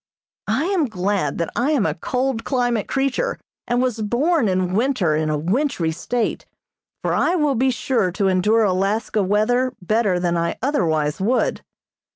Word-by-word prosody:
I - - +1
am 370 -4 +1
glad 190 - -1
that 170 - -2
I 250 +5 +1
am 260 -9 +2
a 160 - +1
cold 250 - -2
climate 245 -4 0
creature, 275 - -1 0.3
and 245 +1 +1
was 240 -4 -1
born 260 +6 +1
in 185 -1 0
winter 215 - +1
in 155 0 0
a 150 - 0
wintry 185 - 0
state, 235 +8 -2 0.6
for - - 0
I 355 - +2
will 300 -5 +2
be 260 +2 +2
sure 245 -6 0
to 195 0 0
endure 210 +5 +3
Alaska 205 +3 0
weather 230 +6 +1
better 200 -1 +1
than 175 -1 0
I 170 0 -1
otherwise 160 - 0
would. 235 +6 +1
220 Hz, 165 wpm, -21 LUFS, 185-255 Hz, 0.6 s, endure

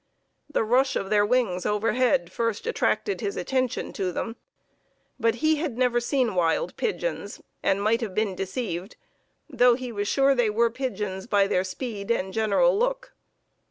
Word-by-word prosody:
The 295 - +1
rush 255 +4 +2
of 195 - -3
their 205 -1 +4
wings 205 -6 +1
overhead 215 -3 +1
first 230 - -2
attracted 445 -3 0
his 405 +1 -3
attention 255 - -1
to 190 -3 -2
them. 225 +6 -4 0.8
But 230 -1 +2
he 315 0 +4
had 295 -6 -3
never 250 -1 +2
seen 245 -2 0
wild 180 - 0
pigeons, 485 +2 -3 0.2
and 195 +1 +1
might 225 +3 +2
have 205 -5 -4
been 215 -2 0
deceived, 190 0 -4 0.5
though 250 -4 +4
he 250 -1 -6
was 205 -2 -3
sure 275 +3 +4
they 245 -4 +2
were 230 +2 +2
pigeons 210 -6 -4
by 200 -3 +3
their 185 -2 +1
speed 200 +1 -6
and 190 -5 0
general 220 +5 +3
look. - - -1
230 Hz, 160 wpm, -25 LUFS, 200-260 Hz, 0.8 s, their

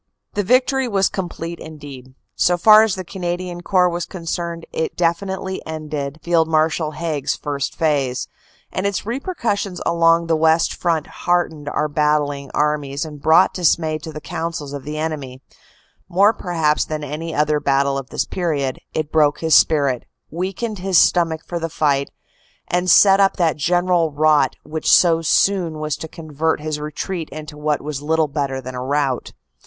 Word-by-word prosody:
The 205 - 0
victory 255 +5 +2
was 195 -4 +2
complete 170 -2 -5
indeed; 140 -4 -11 0.2
so 175 0 +2
far 215 +4 +8
as 220 -3 +1
the 185 - -5
Canadian 175 0 -4
Corps 180 0 +3
was 175 0 -3
concerned 170 -1 -5
it 160 - -2
definitely 190 +2 -1
ended 155 -2 -5
Field 165 -1 +2
Marshal 155 0 +1
Haig 155 -4 -3
s - - +1
"first 140 -2 -4
phase"; 140 -6 0 0.4
and 190 +2 -1
its 200 -1 -3
repercussion 230 - -2
along 165 0 +3
the 165 -1 +1
West 160 +1 +3
Front 165 -3 -1
heart 175 -1 0
ened 145 -2 -8
our 150 - 0
battling 145 -2 0
armies 150 -1 0
and 150 -2 -10
brought 160 +5 +5
dismay 160 -3 +1
to 160 +1 -8
the 150 - -7
counsels 160 -3 -5
of 140 -2 -7
the 150 +1 -5
enemy; 145 -5 -4 0.7
more 200 +5 +4
perhaps 160 -6 0
than 155 -1 -5
any 155 +3 -5
other 150 0 +2
battle 140 -1 +1
of 135 -1 -5
this - - -1
period, 145 -8 -2 0.2
it 155 -1 -2
broke 150 -2 +2
his 160 -1 +1
spirit, 140 -6 +3 0.3
weakened 190 +6 -3
his 190 -1 +1
stomach 165 -3 +3
for 175 - -4
the 165 0 -3
fight, 140 -3 0 0.6
and 180 +1 0
set 195 +2 +7
up 195 -1 +3
that 170 -4 +2
general 175 +1 +1
rot 150 -2 +3
which 155 0 -1
so 165 -2 +5
soon 170 0 +2
was 155 -1 -2
to 160 - -7
convert 155 0 -2
his 155 0 -4
retreat 155 +3 -4
into 155 0 -8
what 150 -1 -1
was 145 -2 -4
little 160 +1 +1
better 140 -2 -2
than 130 0 -7
a 125 - -5
rout. 135 -1 -1
160 Hz, 170 wpm, -20 LUFS, 150-175 Hz, 0.7 s, far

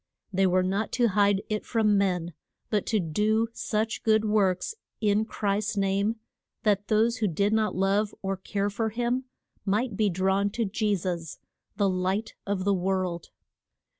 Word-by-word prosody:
They 190 +1 +3
were 185 0 +3
not 195 +4 -1
to 240 -2 +3
hide 200 0 +3
it 215 -1 -2
from 220 -3 +2
men, 180 -4 0 0.4
but 210 -3 0
to 220 - +2
do 210 +7 +1
such 220 0 -2
good 220 -1 +3
works, 200 - +1 0.3
in 210 0 +2
Christ's 210 0 -1
name, 200 +3 +1 0.5
that 205 -2 +2
those 225 +2 +2
who 220 -2 +1
did 200 +4 +1
not 220 -1 +1
love 195 +3 +1
or 195 0 -1
care 200 +2 -2
for 220 +2 -1
him 240 +3 -1 0.4
might 210 +3 0
be 210 0 +2
drawn 190 +2 +1
to 230 -1 0
Je 210 +1 0
sus 170 -4 -4 0.4
the 200 -1 +3
light 190 +3 -1
of 200 -2 -1
the 200 +1 +2
world. 185 -2 -1
205 Hz, 165 wpm, -27 LUFS, 190-215 Hz, 0.5 s, They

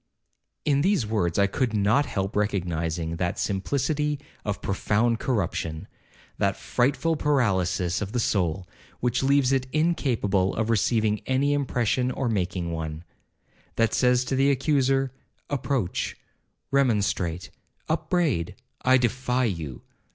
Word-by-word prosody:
In 140 -2 +3
these 190 - +2
words 105 -6 0
I 100 - +5
could 115 +3 -1
not 110 +8 +3
help 95 0 -3
recognizing 85 -5 -1
that 90 0 -1
simplicity 145 +8 -1 0.2
of 105 -1 -2
profound 110 +4 +1
corruption,1—that 85 - -3
frightful 145 +6 +1
paralysis 95 - +1
of 100 -1 -3
the 125 - -1
soul, 95 -4 0 0.3
which 125 0 0
leaves 135 -1 +3
it 130 -1 +1
incapable 120 - +1
of 110 +1 0
receiving 110 0 +1
any 140 +2 +2
impression 125 -3 0
or 130 -1 -1
making 90 -4 -1
one,—that 80 +7 -5
says 125 0 +3
to 135 - -1
the 135 +1 +3
accuser, 135 -1 +2 0.4
Approach, 135 -8 -1 0.5
remonstrate, 100 -10 +1 0.4
upbraid—I 130 - 0
defy 125 +1 0
you. 80 - -4
115 Hz, 115 wpm, -26 LUFS, 95-135 Hz, 0.5 s, I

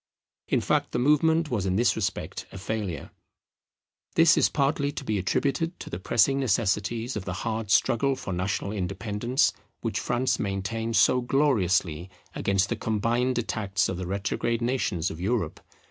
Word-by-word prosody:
In - - +1
fact - - 0
the - - +1
movement 150 +4 +3
was 100 -5 0
in 95 - 0
this 120 +4 +3
respect 95 -3 -3
a - - -8
failure. 100 -5 -4 1.0
This 165 0 +6
is - - +3
partly 140 0 +1
to 140 - -6
be 110 -5 -1
attributed 140 - -1
to - - -8
the 85 - -4
pressing 120 +8 +3
necessities 115 0 0
of 100 -3 -4
the 90 - -3
hard 110 -2 -2
struggle 130 +6 +3
for 95 - -5
national 95 +2 -2
independence 105 +7 0 0.3
which - - -2
France 125 +2 0
maintained 110 +4 -2
so 125 +2 +4
gloriously 95 - +1 0.2
against 100 0 +1
the - - 0
combined 120 +4 0
attacks 105 -4 0
of 95 - -3
the 90 -1 -4
retrograde 100 +4 -1
nations 120 -9 0
of 80 - -8
Europe. 100 -5 -1
110 Hz, 160 wpm, -26 LUFS, 95-130 Hz, 1.0 s, This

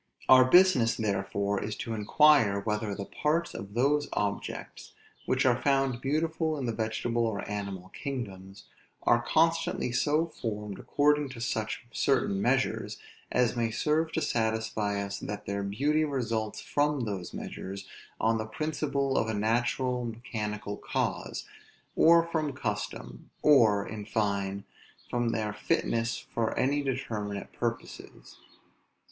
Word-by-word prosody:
Our 130 -1 +8
business 130 -6 +5
therefore 100 -1 -1
is 105 - -3
to 115 - -4
inquire, 110 -1 +4
whether 105 0 -2
the 100 - -5
parts 160 +8 -1
of 100 +1 -8
those 145 +4 +2
objects, 100 -1 -4 0.3
which 130 +1 +2
are 125 -1 +3
found 135 -3 +1
beautiful 160 +2 0
in 135 - -3
the 115 - 0
vegetable 115 +1 -1
or 100 -3 -3
animal 100 -3 -5
kingdoms, 100 -9 -6 0.4
are 120 0 +4
constantly 165 0 +1
so 150 +6 +2
formed 105 - -5
according 150 0 +2
to 130 -2 -9
such 110 -1 -2
certain 100 -8 +1
measures, 130 +4 0 0.3
as 125 -2 +2
may 115 -1 +1
serve 155 +7 0
to 160 - 0
satisfy 110 -4 0
us 100 0 -4
that 105 0 -6
their 100 0 -2
beauty 140 +11 +1
results 115 -7 -2
from 145 -1 0
those 100 -6 -4
measures, 100 +1 -7 0.3
on 115 0 +2
the 110 - -3
principle 140 +1 -1
of 110 - 0
a 110 - -1
natural 120 +4 0
mechanical 105 -3 -4
cause; - - -2 0.5
or 170 0 +6
from 155 -4 -1
custom; 105 - -5
or, 110 -9 +5
in 105 -1 -6
fine, 100 -2 -1 0.5
from 120 -1 +1
their 110 -2 -2
fitness 115 +2 0 0.2
for 115 -1 -1
any 140 +2 +2
determinate 110 -7 -3
purposes. 115 -1 -5
115 Hz, 135 wpm, -29 LUFS, 105-140 Hz, 0.5 s, Our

